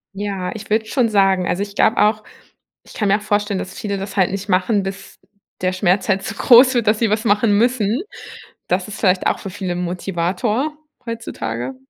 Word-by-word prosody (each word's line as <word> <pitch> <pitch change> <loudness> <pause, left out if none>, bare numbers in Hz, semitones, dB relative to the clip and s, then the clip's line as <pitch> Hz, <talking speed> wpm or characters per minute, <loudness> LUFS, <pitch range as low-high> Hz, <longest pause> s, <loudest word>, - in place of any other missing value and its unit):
Ja, 195 -2 -3
ich 220 -1 -9
würde 220 +1 +1
schon 240 0 +1
sagen, 195 -3 +2
also, 180 +3 -1
ich 200 0 -8
glaube 220 - +3
auch 215 0 +2 0.6
ich - - -15
kann 210 - -1
mir 200 +1 +4
auch - - -11
vorstellen, 205 -1 -1
dass 185 - -7
viele 200 -2 -3
das 195 +1 -7
halt 190 -2 +3
nicht 200 +1 -5
machen, 195 +2 +2
bis 195 0 -7 0.4
der 185 0 +1
Schmerz 185 +1 +1
halt 195 -1 +2
so - - -5
groß 255 +2 +6
wird, 235 -2 +1
dass 215 0 +3
sie 230 - +2
was 215 +1 0
machen 210 -1 +3
müssen. 235 +1 +1 0.7
Das 180 +2 0
ist 200 - -8
vielleicht 185 -2 +2
auch - - 0
für 195 - -7
viele 185 0 -5
'n 175 - -3
Motivator 195 - -2 0.3
heutzutage. 130 - -5
200 Hz, 205 wpm, -19 LUFS, 185-220 Hz, 0.7 s, groß